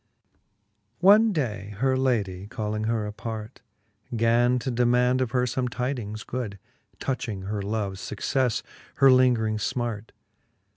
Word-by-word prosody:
One 210 +4 +6
day 105 - -3
her 130 +3 +2
ladie, 105 -8 0
calling 110 -1 -3
her 110 -1 0
apart, 110 +2 -6 0.5
Gan 120 +2 +3
to 125 +2 -3
demaund 125 +1 +2
of 130 - 0
her 125 +1 +1
Ibme 125 +1 -1
tydings 120 -3 -4
good, 115 -6 -4 0.4
Touching 115 -7 -3
her 100 +1 -3
loves 100 -2 -3
fuccefle, 125 +6 -1 0.3
her 135 -1 +6
lingring 120 -4 +3
fmart. 115 -2 -3
115 Hz, 125 wpm, -26 LUFS, 105-130 Hz, 0.5 s, One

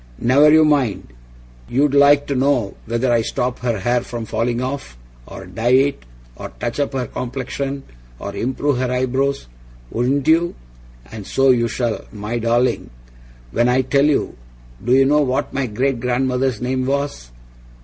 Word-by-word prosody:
'Never 140 +5 +5
YOU 155 0 +6
mind! 135 - +1 0.6
You'd 140 +2 +2
like 145 0 +5
to 140 - -2
know 130 -6 +1
whether 120 +2 0
I 115 - +3
stop 125 +2 -2
her 120 -3 -1
hair 120 +3 +1
from 120 -1 -6
falling 120 +2 -1
off, 130 - -5 0.3
or - - -9
dye 120 +3 -1
it, 135 - 0 0.3
or - - -7
touch 120 +3 -3
up 145 - -1
her 130 -2 -1
complexion, 135 +3 -4 0.3
or - - -7
improve 130 +2 -1
her 130 -1 -1
eyebrows, 130 +2 0 0.5
wouldn't 130 +4 0
you? 165 +2 +3 0.6
And 110 -3 -8
so 135 0 +3
you 120 -2 +2
shall, 120 -1 -2
my 105 +3 -4
darling 120 +2 +1 0.6
when 120 - +2
I 130 +1 +3
tell 140 +2 +2
you! 150 - 0 0.5
Do 120 - -1
you 135 0 +5
know 150 +2 +3
what 135 0 -1
my 135 -1 -1
great 125 +3 -1
grandfather's 125 0 0
name 130 +1 -1
was? 140 - -2
130 Hz, 160 wpm, -19 LUFS, 120-140 Hz, 0.6 s, YOU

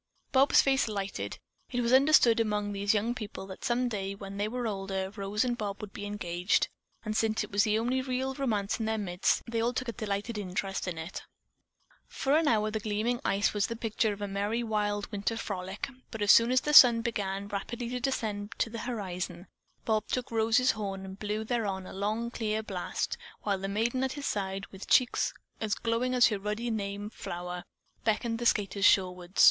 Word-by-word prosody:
Bob's 270 +1 +5
face 270 -2 +2
lighted. 200 -2 -4 0.3
It 245 -1 -1
was 235 +1 +1
understood 265 -4 +6
among 210 -2 0
these 200 +1 +1
young 220 +3 +1
people 215 -5 -6
that 190 -1 -10
some 245 +1 +1
day, 200 -4 -3
when 195 0 -8
they 205 +1 0
were 245 +2 -3
older, 195 -2 -2
Rose 205 +3 -1
and 245 -1 0
Bob 205 -3 -4
would 210 -2 -8
be 205 - -5
engaged, 180 -2 0 0.4
and 215 0 -2
since 220 0 +1
it - - -9
was 200 +2 +3
the 215 0 +2
only 245 +3 +1
real 260 +1 -2
romance 225 -7 -1
in 220 - -1
their 220 0 0
midst, 180 -3 0
they 230 -1 -1
all 240 +2 +1
took 255 -1 -2
a - - -3
delighted 210 0 -3
interest 195 0 -3
in 175 -2 -3
it. 160 +3 -6 0.9
For 275 +2 0
an 320 0 +3
hour 215 -4 +2
the 220 - -1
gleaming 215 +3 -1
ice 200 +1 +2
was 205 -1 +1
the 230 - -4
picture 225 -1 0
of 205 0 -5
a - - -1
merry 205 +4 -1
mid 210 -2 -1
winter 205 +2 -1
frolic, 190 -2 -4 0.2
but, 225 -2 -3
as 205 - +6
soon 230 +1 +7
as 255 - +4
the 300 - -1
sun 240 -5 +10
began 200 -4 -2
rapidly 230 +4 -4
to 250 0 -2
descend 215 -6 -2
to 225 - 0
the 230 - -5
horizon, 185 -6 -4 0.4
Bob 220 -1 +1
took 250 -2 -2
Rose's 230 +3 +3
horn 195 -3 -4
and 190 +1 -9
blew 210 +1 -2
thereon 210 -5 -2
a - - -9
long, 215 +4 -2
clear 220 -2 -1
blast, 190 -4 -3 0.2
while 200 -2 0
the 195 - -3
maiden 230 +6 0
at 265 - -1
his 285 -1 -6
side, 195 -1 -2
with 190 0 -9
cheeks 255 - +3 0.3
as 215 -2 0
glowing 240 +2 0
as 245 - +7
her 210 -3 -2
ruddy 210 +4 -2
name 205 -1 -3
flower, 180 -2 -5 0.4
beckoned 230 +1 0
the 240 - +2
skaters 200 -2 +1
shoreward. 180 -2 +3
215 Hz, 205 wpm, -30 LUFS, 200-235 Hz, 0.9 s, sun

